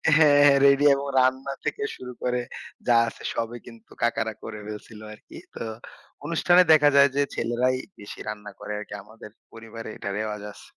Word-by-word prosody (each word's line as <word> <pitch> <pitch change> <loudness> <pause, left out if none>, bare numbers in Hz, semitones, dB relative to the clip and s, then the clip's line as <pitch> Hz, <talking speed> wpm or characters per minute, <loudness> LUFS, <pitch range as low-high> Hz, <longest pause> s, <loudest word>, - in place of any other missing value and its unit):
হ্যাঁ, 150 -2 +6
হ্যাঁ। 140 -1 +6
রেডি 140 +1 +4
এবং 140 +1 -4
রান্না 130 +2 +1
থেকে 430 - -2
শুরু 125 0 -9
করে 125 0 0 0.5
যা 120 - +5
আছে - - -9
সবই 115 +1 -3
কিন্তু 115 -1 -15
কাকারা 110 -1 0
করে 110 -1 -7
ফেলছিল 105 +1 -9
আরকি। 105 - -14 0.2
তো - - -5 0.6
অনুষ্ঠানে 175 +2 +4
দেখা 150 -2 +6
যায় 140 0 +7
যে 145 - +2
ছেলেরাই 125 +2 0 0.2
বেশি 100 - -10
রান্না 105 -1 -6
করে 105 0 -7
আরকি। 105 - -9
আমাদের 105 0 -14 0.2
পরিবারে 115 0 -9
এটা 100 - -5
রেওয়াজ 105 -1 -4
আছে। - - -16
120 Hz, 175 wpm, -25 LUFS, 110-140 Hz, 0.6 s, যায়